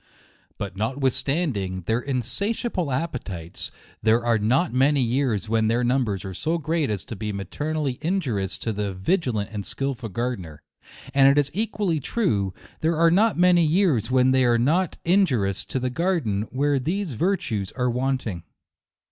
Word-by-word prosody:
But 100 Hz, -3 st, -5 dB
notwith 130 Hz, +6 st, 0 dB
standing 120 Hz, -, -1 dB
their 110 Hz, +7 st, 0 dB
insatiable 150 Hz, -, -2 dB
appetites, 110 Hz, -, -4 dB, 0.3 s
there 115 Hz, +2 st, +3 dB
are 115 Hz, -2 st, +3 dB
not 130 Hz, -, +2 dB
many 135 Hz, +1 st, +3 dB
years 120 Hz, -3 st, 0 dB
when 110 Hz, 0 st, +2 dB
their 120 Hz, +2 st, +1 dB
numbers 120 Hz, -6 st, 0 dB
are 95 Hz, -, -5 dB
so 160 Hz, -, -1 dB
great 160 Hz, -1 st, -1 dB
as 105 Hz, -3 st, -2 dB
to 115 Hz, -, -6 dB
be 105 Hz, +1 st, -4 dB
materially 140 Hz, +7 st, -3 dB
injurious 135 Hz, -, -1 dB
to 110 Hz, -, -3 dB
the 100 Hz, -2 st, -3 dB
vi 95 Hz, -, +2 dB
gilant 110 Hz, -, -2 dB
and 105 Hz, -1 st, -3 dB
skilful 135 Hz, 0 st, -4 dB
gardener; 95 Hz, -, -4 dB, 0.5 s
and 135 Hz, 0 st, +6 dB
it 140 Hz, -, +3 dB
is 145 Hz, -1 st, +2 dB
equally 205 Hz, -4 st, -1 dB
true, 110 Hz, -, 0 dB, 0.3 s
there 160 Hz, 0 st, +1 dB
are 165 Hz, 0 st, +5 dB
not 215 Hz, +5 st, +3 dB
many 175 Hz, -1 st, +5 dB
years 160 Hz, -, +2 dB
when 130 Hz, 0 st, +4 dB
they 130 Hz, 0 st, +4 dB
are 120 Hz, -1 st, +4 dB
not 160 Hz, +9 st, +1 dB
injurious 135 Hz, -, +2 dB
to 130 Hz, -, -3 dB
the 125 Hz, 0 st, -2 dB
garden 125 Hz, -, 0 dB
where 140 Hz, +2 st, +1 dB
these 170 Hz, +4 st, -2 dB
vir 185 Hz, -, +1 dB
tues 105 Hz, -, -3 dB
are 125 Hz, -1 st, 0 dB
wanting. 125 Hz, -7 st, -1 dB
130 Hz, 165 wpm, -24 LUFS, 110-160 Hz, 0.5 s, and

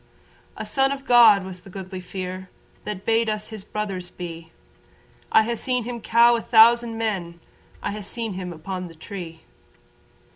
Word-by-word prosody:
A -, -, -5 dB
son 270 Hz, 0 st, +2 dB
of 275 Hz, -1 st, -5 dB
God 225 Hz, -6 st, +7 dB
was 185 Hz, -1 st, -9 dB
the 195 Hz, -, -14 dB
Goodly 185 Hz, 0 st, -7 dB
Fere 185 Hz, 0 st, -6 dB, 0.4 s
That 200 Hz, -2 st, -5 dB
bade 225 Hz, 0 st, +2 dB
us 215 Hz, 0 st, -3 dB
his 215 Hz, -3 st, -8 dB
brothers 195 Hz, -4 st, -4 dB
be. 165 Hz, -2 st, -8 dB, 0.8 s
I 220 Hz, -, +6 dB
ha' 235 Hz, +2 st, -2 dB
seen 250 Hz, +1 st, -1 dB
him 240 Hz, 0 st, -6 dB
cow 235 Hz, +2 st, +5 dB
a 230 Hz, -, -1 dB
thousand 230 Hz, 0 st, +5 dB
men. 185 Hz, -7 st, -3 dB, 0.4 s
I -, -, -1 dB
have 205 Hz, -1 st, -6 dB
seen 225 Hz, 0 st, -4 dB
him 180 Hz, -1 st, -5 dB
upon 180 Hz, +3 st, -6 dB
the 165 Hz, -, -13 dB
tree. 165 Hz, 0 st, -8 dB
205 Hz, 170 wpm, -23 LUFS, 185-230 Hz, 0.8 s, God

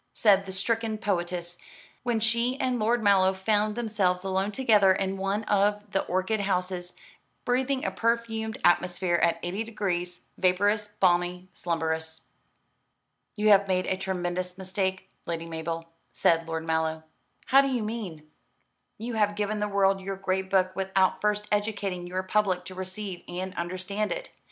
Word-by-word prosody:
said 195 Hz, -3 st, +4 dB
the -, -, -5 dB
stricken 220 Hz, +3 st, -1 dB
poetess, 175 Hz, -4 st, -2 dB, 0.4 s
when 240 Hz, -2 st, 0 dB
she 235 Hz, +4 st, +1 dB
and 255 Hz, -2 st, 0 dB
Lord 230 Hz, +2 st, +1 dB
Mallow 190 Hz, -2 st, +4 dB
found 210 Hz, +2 st, +1 dB
themselves 205 Hz, -6 st, 0 dB
alone 190 Hz, +1 st, 0 dB
together 210 Hz, -5 st, +4 dB
in 190 Hz, 0 st, -1 dB
one 195 Hz, +2 st, -1 dB
of 205 Hz, 0 st, +1 dB
the 195 Hz, -, +1 dB
orchid 185 Hz, +4 st, 0 dB
houses, 180 Hz, -2 st, -1 dB, 0.5 s
breathing 260 Hz, +3 st, 0 dB
a -, -, 0 dB
perfumed 230 Hz, -1 st, -1 dB
atmosphere 175 Hz, 0 st, +3 dB
at 170 Hz, -, +3 dB
eighty 190 Hz, +5 st, -2 dB
degrees, 180 Hz, -5 st, -3 dB, 0.2 s
vaporous, 205 Hz, +3 st, +2 dB
balmy, 180 Hz, 0 st, +2 dB
slumberous. 160 Hz, -2 st, -3 dB, 1.1 s
"You 215 Hz, 0 st, +2 dB
have 200 Hz, -1 st, +6 dB
made 185 Hz, -1 st, +1 dB
a 190 Hz, -, 0 dB
tremendous 180 Hz, -1 st, -3 dB
mistake, 190 Hz, 0 st, -2 dB, 0.2 s
Lady 165 Hz, -1 st, -3 dB
Mabel," 165 Hz, 0 st, -4 dB, 0.3 s
said 165 Hz, 0 st, +2 dB
Lord 160 Hz, 0 st, -3 dB
Mallow. 160 Hz, -1 st, 0 dB, 0.4 s
"How 270 Hz, +1 st, +6 dB
do 275 Hz, -, 0 dB
you 250 Hz, -4 st, -1 dB
mean?" 200 Hz, -9 st, -5 dB, 0.7 s
"You 230 Hz, +3 st, -5 dB
have 210 Hz, -2 st, +1 dB
given 210 Hz, +1 st, -1 dB
the 210 Hz, 0 st, -1 dB
world 195 Hz, -1 st, +2 dB
your 195 Hz, +1 st, -4 dB
great 190 Hz, 0 st, -1 dB
book 185 Hz, -1 st, +2 dB
without 190 Hz, -1 st, +1 dB
first 210 Hz, 0 st, 0 dB
educating 205 Hz, -4 st, -1 dB
your 185 Hz, +1 st, -2 dB
public 185 Hz, -2 st, +1 dB
to 185 Hz, -, -7 dB
receive 185 Hz, 0 st, -6 dB
and 185 Hz, +1 st, -4 dB
understand 185 Hz, +4 st, -3 dB
it. -, -, -4 dB
195 Hz, 150 wpm, -27 LUFS, 180-210 Hz, 1.1 s, have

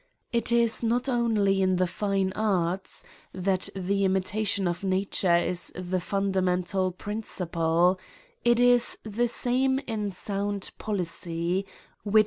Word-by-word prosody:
It 235 Hz, -1 st, +1 dB
is 235 Hz, -1 st, +3 dB
not 240 Hz, +3 st, +1 dB
only 220 Hz, -6 st, +2 dB
in 185 Hz, -1 st, +3 dB
the 185 Hz, 0 st, +2 dB
fine 195 Hz, 0 st, -1 dB
arts 190 Hz, -3 st, -1 dB, 0.3 s
that 185 Hz, 0 st, 0 dB
the 195 Hz, +1 st, 0 dB
imitation 195 Hz, +1 st, 0 dB
of 175 Hz, +2 st, -3 dB
nature 190 Hz, -2 st, +2 dB
is 175 Hz, +1 st, 0 dB
the 185 Hz, 0 st, -2 dB
fundamental 185 Hz, -1 st, 0 dB
principle; 180 Hz, -3 st, 0 dB, 0.4 s
it 240 Hz, 0 st, +4 dB
is 245 Hz, -1 st, +4 dB
the 225 Hz, +3 st, 0 dB
CRIMES 260 Hz, +3 st, +1 dB
AND 205 Hz, -2 st, -2 dB
PUNISHMENTfi. 175 Hz, -2 st, -2 dB
195 Hz, 115 wpm, -27 LUFS, 185-220 Hz, 0.4 s, it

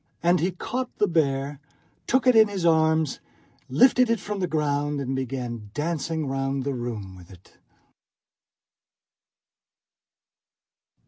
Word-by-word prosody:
And 175 Hz, +1 st, +4 dB
he 175 Hz, -, +1 dB
caught 250 Hz, +8 st, -5 dB
the 210 Hz, -, +2 dB
bear, 140 Hz, -4 st, 0 dB, 0.5 s
took 260 Hz, +1 st, +2 dB
it 255 Hz, -2 st, +5 dB
in 220 Hz, -1 st, +7 dB
his 195 Hz, -4 st, -3 dB
arms, 160 Hz, -2 st, +2 dB, 0.5 s
lifted 245 Hz, -, +4 dB
it 230 Hz, -2 st, +1 dB
from 205 Hz, +1 st, -5 dB
the 180 Hz, -, 0 dB
ground, 145 Hz, -2 st, -1 dB
and 135 Hz, -1 st, -3 dB
began 125 Hz, -4 st, -4 dB
dancing 160 Hz, 0 st, -2 dB
round 135 Hz, 0 st, -2 dB
the 140 Hz, +1 st, -2 dB
room 115 Hz, -6 st, -5 dB
with 90 Hz, -1 st, -15 dB
it. 95 Hz, -2 st, -18 dB
150 Hz, 125 wpm, -25 LUFS, 135-180 Hz, 0.5 s, in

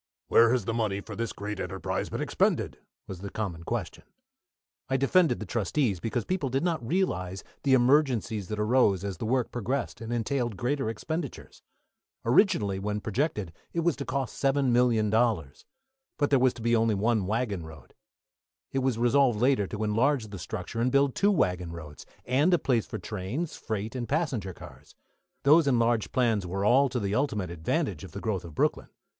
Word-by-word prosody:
"Where 115 Hz, 0 st, +6 dB
has 125 Hz, -5 st, +1 dB
the 115 Hz, -, -1 dB
money 110 Hz, -4 st, 0 dB
for -, -, -8 dB
this 115 Hz, -1 st, -2 dB
great 105 Hz, -1 st, -5 dB
enterprise -, -, -3 dB
been -, -, -3 dB
expended?" -, -, 0 dB, 0.3 s
was 95 Hz, -, -8 dB
the 100 Hz, +1 st, -6 dB
common 95 Hz, -6 st, -4 dB
question. 85 Hz, -, -4 dB, 0.9 s
I 135 Hz, -, +2 dB
defended 145 Hz, 0 st, +3 dB
the 110 Hz, -, -5 dB
trustees, 110 Hz, -, 0 dB
because 115 Hz, +3 st, -2 dB
people 180 Hz, -7 st, -1 dB
did 135 Hz, +4 st, 0 dB
not 165 Hz, -7 st, 0 dB
realise 95 Hz, -, -1 dB, 0.2 s
the 135 Hz, -2 st, +4 dB
emergencies 125 Hz, -6 st, +2 dB
that 105 Hz, -, -4 dB
arose 105 Hz, -3 st, +3 dB
as 100 Hz, -3 st, -4 dB
the 110 Hz, -, -4 dB
work 125 Hz, 0 st, 0 dB
progressed 125 Hz, +3 st, -3 dB
and 115 Hz, +1 st, -5 dB
entailed 120 Hz, -2 st, -1 dB
greater 130 Hz, +2 st, -1 dB
expenditures. 150 Hz, +6 st, -5 dB, 0.6 s
Originally, 115 Hz, -, +3 dB
when 105 Hz, +1 st, -2 dB
projected, 105 Hz, -, -2 dB, 0.2 s
it 170 Hz, -, 0 dB
was 170 Hz, -3 st, +2 dB
to -, -, -3 dB
cost 135 Hz, -2 st, -3 dB
$7,000,000, 120 Hz, -, +2 dB, 0.5 s
but 145 Hz, -1 st, +1 dB
there 135 Hz, -, +5 dB
was 130 Hz, 0 st, +3 dB
to 115 Hz, -, -9 dB
be 115 Hz, 0 st, +3 dB
only 115 Hz, -1 st, +2 dB
one 105 Hz, -1 st, +1 dB
waggon 105 Hz, -4 st, -1 dB
road. 80 Hz, -2 st, -13 dB, 0.8 s
It 135 Hz, -, 0 dB
was 130 Hz, -3 st, 0 dB
resolved 120 Hz, -1 st, +3 dB
later 125 Hz, -5 st, +3 dB
to 105 Hz, +3 st, -4 dB
enlarge 115 Hz, +2 st, +1 dB
the 100 Hz, -2 st, -7 dB
structure 105 Hz, +5 st, -5 dB
and 125 Hz, +2 st, +2 dB
build 140 Hz, -1 st, +3 dB
two 200 Hz, -, +2 dB
waggon 90 Hz, -, 0 dB
roads, 75 Hz, -3 st, -10 dB, 0.2 s
and 140 Hz, +8 st, +3 dB
a -, -, +2 dB
place 120 Hz, -8 st, 0 dB
for -, -, -5 dB
trains, 110 Hz, -, -4 dB
freight, 110 Hz, 0 st, -4 dB
and 120 Hz, -2 st, -4 dB
passenger 130 Hz, -, -1 dB
cars. -, -, -14 dB, 0.5 s
Those 150 Hz, +2 st, +6 dB
enlarged 115 Hz, -3 st, +2 dB
plans 115 Hz, -7 st, +1 dB
were 95 Hz, +3 st, -2 dB
all 135 Hz, +5 st, +5 dB
to 125 Hz, 0 st, -2 dB
the 100 Hz, -2 st, -2 dB
ultimate 105 Hz, -, -1 dB
advantage 80 Hz, -2 st, -2 dB
of -, -, -10 dB
the -, -, -5 dB
growth 100 Hz, -5 st, -2 dB
of 85 Hz, -3 st, -10 dB
Brooklyn. -, -, 0 dB
115 Hz, 180 wpm, -28 LUFS, 100-135 Hz, 0.9 s, Where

